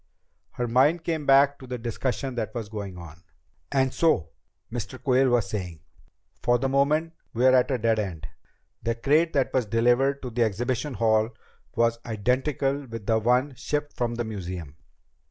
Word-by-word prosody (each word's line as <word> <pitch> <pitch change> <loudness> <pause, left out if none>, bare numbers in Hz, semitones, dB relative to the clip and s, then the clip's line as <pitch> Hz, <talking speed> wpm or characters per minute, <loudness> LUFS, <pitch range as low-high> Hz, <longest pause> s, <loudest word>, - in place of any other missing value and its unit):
Her 120 - -2
mind 140 +8 +3
came 160 -3 -2
back 140 +1 +5
to 130 - -11
the 125 0 -4
discussion 125 +3 -3
that 110 -2 -4
was 110 -3 -4
going 100 -4 -6
on. 85 -1 -11 0.3
"... 90 +1 -43
and 130 -1 +1
so," 90 - +2 0.4
Mr. 120 +2 -5
Quayle 130 +1 +3
was 120 -3 +2
saying, 90 -6 -5 0.6
"for 120 0 +3
the 135 - -1
moment 150 +5 +1 0.2
we're 130 +2 +5
at 130 +1 +4
a 130 - +1
dead 115 -1 +1
end. 85 -6 -4 0.5
The 115 +1 -1
crate 150 +8 +2
that 135 -2 +1
was 125 -4 +1
delivered 120 +6 +2
to 125 - -5
the 120 +1 -2
exhibition 120 +5 -1
hall 110 0 +2 0.5
was 115 0 +2
identical 130 +5 -1
with 115 -3 -7
the 110 +1 +2
one 125 +5 +2
shipped 145 +3 -3
from 120 -1 -1
the 120 - -2
museum. 90 -8 -6
120 Hz, 175 wpm, -26 LUFS, 110-135 Hz, 0.6 s, back